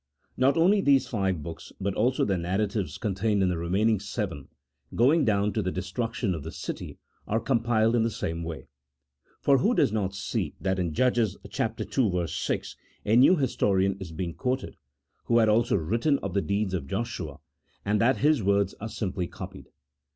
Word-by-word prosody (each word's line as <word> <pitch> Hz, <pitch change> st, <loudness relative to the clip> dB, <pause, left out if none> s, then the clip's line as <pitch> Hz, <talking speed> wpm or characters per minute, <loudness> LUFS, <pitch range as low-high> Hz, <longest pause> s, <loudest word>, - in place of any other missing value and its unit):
Not 135 Hz, +4 st, +3 dB
only 195 Hz, +5 st, +4 dB
these 140 Hz, -5 st, +4 dB
five 95 Hz, -, -1 dB
books, 80 Hz, +1 st, -8 dB
but 100 Hz, 0 st, -1 dB
also 125 Hz, +6 st, +1 dB
the 100 Hz, -, +1 dB
narratives 95 Hz, +3 st, -1 dB
contained 105 Hz, 0 st, 0 dB
in 95 Hz, -, +2 dB
the 90 Hz, -, -1 dB
remaining 100 Hz, +5 st, +1 dB
seven, 100 Hz, -, -4 dB, 0.5 s
going 140 Hz, +6 st, +4 dB
down 105 Hz, -1 st, +1 dB
to 110 Hz, -, 0 dB
the 95 Hz, -2 st, -1 dB
destruction 100 Hz, +3 st, -2 dB
of 80 Hz, -, -5 dB
the -, -, -7 dB
city, -, -, -6 dB, 0.3 s
are 110 Hz, +2 st, +1 dB
compiled 115 Hz, -1 st, +2 dB
in 120 Hz, -, +3 dB
the 115 Hz, -, +2 dB
same 85 Hz, -5 st, -4 dB
way. 80 Hz, -1 st, -6 dB, 0.8 s
For 140 Hz, -2 st, +4 dB
who 235 Hz, -, +2 dB
does -, -, +3 dB
not 100 Hz, -3 st, -1 dB
see 95 Hz, -, -3 dB
that 95 Hz, -1 st, -1 dB
in 85 Hz, -4 st, -2 dB
Judges 120 Hz, -6 st, +2 dB
ii. 110 Hz, -6 st, -1 dB
6 -, -, -3 dB, 0.3 s
a 110 Hz, -, +3 dB
new 135 Hz, +9 st, +7 dB
historian 100 Hz, -, +1 dB
is 95 Hz, -4 st, -7 dB
being 85 Hz, +1 st, -4 dB
quoted, 130 Hz, +4 st, -2 dB, 0.5 s
who 120 Hz, -, +3 dB
had 110 Hz, -2 st, +4 dB
also 115 Hz, +2 st, +3 dB
written 115 Hz, -, +1 dB
of 100 Hz, -2 st, -3 dB
the 100 Hz, -, +2 dB
deeds 100 Hz, -1 st, -1 dB
of 85 Hz, -7 st, -3 dB
Joshua, 115 Hz, +5 st, -4 dB, 0.5 s
and 105 Hz, +1 st, +1 dB
that 125 Hz, +3 st, +3 dB
his 150 Hz, -2 st, +3 dB
words 100 Hz, 0 st, +2 dB
are 110 Hz, -, -4 dB
simply 95 Hz, -5 st, -3 dB
copied -, -, -9 dB
105 Hz, 180 wpm, -27 LUFS, 95-120 Hz, 0.8 s, new